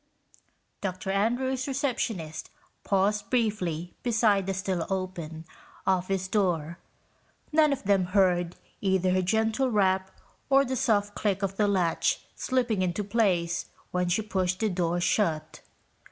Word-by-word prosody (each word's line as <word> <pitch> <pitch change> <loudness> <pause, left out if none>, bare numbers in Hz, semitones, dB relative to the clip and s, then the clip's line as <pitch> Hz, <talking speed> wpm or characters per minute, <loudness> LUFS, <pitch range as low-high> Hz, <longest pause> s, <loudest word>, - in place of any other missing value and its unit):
Dr. 190 0 -3
Andrews' 250 +6 0
receptionist 230 - -2 0.3
paused 205 +1 +1
briefly 185 -8 -1
beside 220 -5 +2
the 195 - 0
still 190 -3 -2
open 175 -4 -4 0.4
office 190 0 0
door. 170 -5 0 0.7
None 305 -1 +4
of 275 - -2
them 195 -2 +3
heard 180 -2 +2 0.3
either 190 -2 +2
her 185 0 +2
gentle 220 +7 +1
rap 190 -3 +2 0.4
or 275 0 +5
the 260 0 -2
soft 210 -6 +1
click 200 -2 -1
of 195 0 -1
the 210 - +3
latch 180 -5 +1
slipping 245 -6 0
into 185 +3 -1
place 190 -5 +1 0.2
when 180 -1 0
she 195 +5 +1
pushed 185 -3 -1
the 220 - +2
door 175 -2 0
shut. 175 -3 0
195 Hz, 130 wpm, -27 LUFS, 180-220 Hz, 0.7 s, or